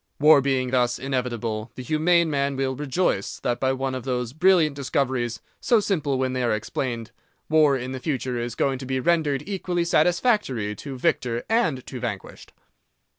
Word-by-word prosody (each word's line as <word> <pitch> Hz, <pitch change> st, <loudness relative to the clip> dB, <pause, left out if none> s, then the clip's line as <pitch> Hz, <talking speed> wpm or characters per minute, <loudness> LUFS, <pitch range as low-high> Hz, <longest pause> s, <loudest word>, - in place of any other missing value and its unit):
War 150 Hz, -1 st, +7 dB
being 130 Hz, -2 st, 0 dB
thus 125 Hz, -1 st, +2 dB
inevitable, 120 Hz, -4 st, -3 dB
the 130 Hz, -, -7 dB
humane 165 Hz, +5 st, +3 dB
man 140 Hz, -1 st, 0 dB
will 135 Hz, 0 st, -1 dB
rejoice 145 Hz, -, -1 dB
that 120 Hz, -1 st, -1 dB
by 130 Hz, 0 st, +1 dB
one 135 Hz, 0 st, -2 dB
of 130 Hz, -2 st, -4 dB
those 125 Hz, -2 st, -2 dB
brilliant 160 Hz, -2 st, +3 dB
discoveries, 130 Hz, -4 st, -1 dB, 0.2 s
so 235 Hz, -, +3 dB
simple 155 Hz, -10 st, 0 dB
when 130 Hz, 0 st, -1 dB
they 130 Hz, -, -1 dB
are 120 Hz, -3 st, +1 dB
explained, 115 Hz, +1 st, -4 dB, 0.4 s
war 155 Hz, -3 st, +4 dB
in 125 Hz, 0 st, -5 dB
the 130 Hz, -, -5 dB
future 130 Hz, -4 st, -2 dB
is 120 Hz, -1 st, -4 dB
going 135 Hz, -2 st, 0 dB
to 130 Hz, -, -7 dB
be 130 Hz, 0 st, -1 dB
rendered 150 Hz, -2 st, +1 dB
equally 180 Hz, -3 st, -2 dB
satisfactory 170 Hz, -, +1 dB
to 135 Hz, +2 st, -7 dB
victor 120 Hz, -1 st, 0 dB
and 220 Hz, -, +1 dB
to 130 Hz, -, -7 dB
vanquished. 110 Hz, -5 st, -6 dB
130 Hz, 175 wpm, -24 LUFS, 125-155 Hz, 0.4 s, War